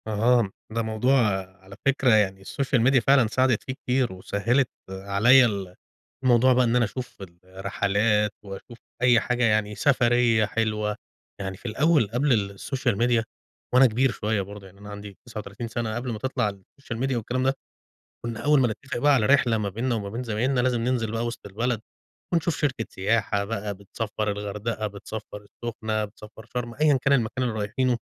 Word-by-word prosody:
اهم، 110 0 +2 0.2
ده 115 +1 -1
موضوع 110 +4 +1 0.5
على 95 +1 -12
فكرة 135 -3 +3
يعني 95 -3 +2
الSocial 135 +1 0
Media 135 0 +5
فعلًا 135 -4 +5
ساعدِت 130 0 +1
فيه 130 - -4
كتير 125 -4 -1
وسهّلِت، 115 +8 0 0.2
عليَّ 100 +7 +4
ال 100 -5 -3 0.5
الموضوع 130 0 +5
بقى 125 +1 +4
إن 115 0 +1
أنا 120 -1 +4
أشوف 125 +4 -7 0.3
الرحلات 100 +3 0
وأشوف 100 +4 -10 0.2
أي 125 -2 +5
حاجة 125 +1 -1
يعني، 105 -2 +2
سفرية 120 -5 +3
حلوة. 105 -1 -1 0.4
يعني 95 -1 -5
في - - -22
الأول 140 +2 +2
قبْل 115 -7 +1
الSocial 125 -5 -1
Media 120 -1 +3 0.5
وأنا 130 +1 +7
كبير 125 +2 +2
شوية 105 -2 -1
برضه، 100 +1 -9
يعني 95 +1 -16
أنا 105 0 -10
عندي 105 -1 -9
39 110 -1 -7
سَنة، 115 -1 -3
قبْل 120 +1 -3
ما 110 - -5
تطلَع 130 -3 0
الSocial 115 +5 -10
Media 135 0 0
والكلام 120 +3 -2
ده، 135 +1 +2 0.7
كنّا 115 -1 -4
أول 150 -1 +5
ما 125 - +4
نتّفق 130 +5 -5
بقى 145 +4 +4
على 120 -6 +3
رحلة 120 -3 +4
ما 105 -2 -2
بيننا 115 +5 -1
وما 100 -3 -4
بين 115 +5 -4
زمايلنا 125 +3 0
لازم 125 -1 +1
ننزِل 115 -2 0
بقى 115 +1 -2
وِسط 120 -2 -6
البلد، 110 +3 -2 0.5
ونشوف 170 -1 +1
شركة 130 -6 -1
سياحة 100 0 0
بقى 105 -1 -3
بتسفّر 105 +2 -4
الغردقة، 105 +2 -3
بتسفّر 105 +1 -8
السُّخنة، 110 0 -3
بتسفّر 105 +1 -14
شرْم، 120 0 -5
أيًا 150 +1 +3
كان 135 - +3
المكان 125 0 0
اللي 120 -3 -1
رايحينه، 120 +4 0
115 Hz, 175 wpm, -25 LUFS, 105-125 Hz, 0.7 s, وأنا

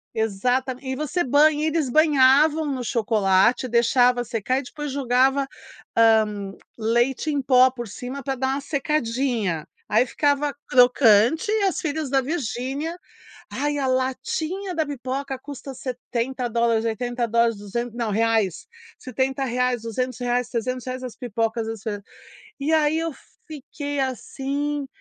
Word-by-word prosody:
Exatamen 250 +5 -1
e - - -2
você 305 +5 -1
banha 295 +3 +4
e - - +1
eles 315 -4 0
banhavam 300 +1 +4
no 255 -2 -3
chocolate, 220 0 +2
deixava 245 +1 +3
secar 240 +3 -1
e - - -6
depois 295 +2 -6
jogava, 265 +1 +2 0.5
hã, 215 -3 +3 0.2
leite 240 +6 +1
em 285 -1 0
pó 255 0 +5
por 240 -2 -7
cima 250 +6 -7
pra 270 +1 -2
dar 265 +1 -1
uma 275 +1 -1
secadinha. 250 - -1 0.2
Aí 225 +4 +4
ficava 285 +2 0
crocante, 250 - +4
e 435 -1 +1
as 385 -2 +1
filhas 310 -2 -2
da 270 -1 +3
Virginia, 280 +2 -3 0.6
ai, 290 +2 -1
a 270 - 0
latinha 265 +9 -2
da 315 -1 +1
pipoca 270 0 -4
custa 275 0 -8
$70, 240 -2 -1
$80, 235 -1 0
duzen 220 +4 -4
não, 235 -2 -2
reais, 220 -3 +1 0.3
R$70, 255 -1 -1
R$200, 245 +1 -2
R$300 255 +2 -3
as 245 -3 -7
pipocas 225 -1 -2
das 225 -2 -5
filhas. 205 -3 -4 0.6
E 285 +3 -1
aí 310 -1 +3
eu 330 0 -2 0.4
fiquei 290 -1 -6
assim, 275 +3 -3
255 Hz, 130 wpm, -23 LUFS, 235-280 Hz, 0.6 s, pó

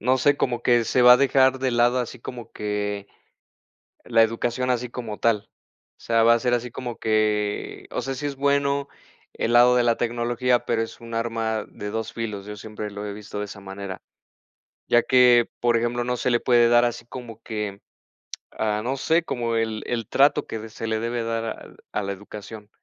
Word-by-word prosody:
...no 130 +4 +3
sé, 140 +2 +3
como 120 -3 -1
que 120 -2 +3
se 125 - +2
va 125 0 +10
a - - +5
dejar 130 -1 +3
de 130 -1 0
lado 120 +1 +3
así 125 0 -4
como 120 -2 -8
que, 105 -1 -3 1.0
la 115 -1 +4
educación 120 +3 -1
así 125 0 0
como 115 -3 -6
tal. 115 -3 +1 0.5
O - - -51
sea, 115 -1 +2
va 115 - +7
a 120 - +2
ser 120 +1 0
así 120 0 -1
como 120 -1 -5
que, 105 -1 -1
o - - -2
sea, 135 - -3
si 135 +3 -5
es 140 -2 -3
bueno 140 0 +1 0.5
el 115 - -1
lado 120 +1 +6
de 125 - +4
la 115 -1 +2
tecnología, 120 +1 0
pero 115 -1 0
es 115 - -6
un 115 0 -9
arma 115 -2 -1
de 105 0 -7
2 110 +1 -4
filos. 105 -4 -5
Yo 105 0 -7
siempre 105 0 -7
lo 100 +1 -7
he 105 - -4
visto 105 0 -7
de 105 - -2
esa 100 0 -10
manera. 95 -1 -7 0.9
Ya 120 0 +4
que, 125 -2 +5
por 120 -1 +2
ejemplo, 120 +1 0
no 125 0 -1
se 125 - -1
le 120 - +3
puede 120 -1 +4
dar 120 0 +5
así 120 -1 -2
como 120 -3 -9
que, 105 -3 -4 0.7
ah, 105 -1 -1
no 130 +3 -1
sé 160 +5 +1
como 120 -6 -2
el 110 -1 -1
el 115 -3 -2
trato 145 +1 +3
que 110 0 -6
se 110 +1 -6
le 110 0 -1
debe 115 0 -2
dar 115 0 -2
al 110 - -8
a 105 - -2
la 100 - -2
educación. 105 +1 -10
115 Hz, 210 wpm, -24 LUFS, 110-125 Hz, 1.0 s, va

